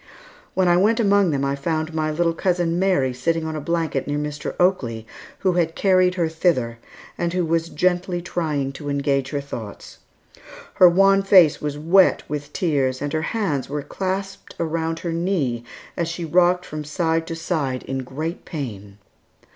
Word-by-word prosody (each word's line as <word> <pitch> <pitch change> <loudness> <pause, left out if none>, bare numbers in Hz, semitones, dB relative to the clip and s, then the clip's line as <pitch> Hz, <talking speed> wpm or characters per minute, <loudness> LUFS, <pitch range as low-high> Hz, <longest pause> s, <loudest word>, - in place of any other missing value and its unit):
When 185 -1 +2
I 175 0 +5
went 215 +5 +3
among 200 -4 +4
them 140 -3 0
I 140 0 0
found 155 +2 -2
my 155 -1 0
little 165 +2 +1
cousin 175 -1 0
Mary 180 -10 +2
sitting 165 +6 -1
on 160 0 -4
a 155 - -4
blanket 160 -3 -1
near 145 0 -1
Mr. 150 0 -4
Oakley, 120 - +1 0.4
who 190 - +3
had 165 -2 0
carried 185 -2 +3
her 170 -3 +1
thither, 150 -8 0 0.4
and 170 0 -1
who 180 -1 0
was 165 0 0
gently 180 +2 0
trying 155 -6 -2
to 145 +1 -7
engage 140 -1 0
her 145 - -2
thoughts. 115 -7 -9 0.7
Her 180 - +7
wan 195 +2 +4
face 185 -6 +5
was 145 -1 -3
wet 175 +5 +4
with 145 0 -5
tears, 140 -8 0
and 145 +1 -4
her 155 - 0
hands 160 - -2
were 145 0 -3
clasped 195 +2 -4
around 165 0 -1
her 170 -2 -3
knee 165 -9 -1 0.3
as 170 - -1
she 170 0 -4
rocked 180 +2 +3
from 155 0 -6
side 160 +2 -1
to 165 - -4
side 150 -6 -2
in 135 0 -4
great 150 +6 -5
pain. 105 - -7
165 Hz, 175 wpm, -22 LUFS, 145-180 Hz, 0.7 s, Her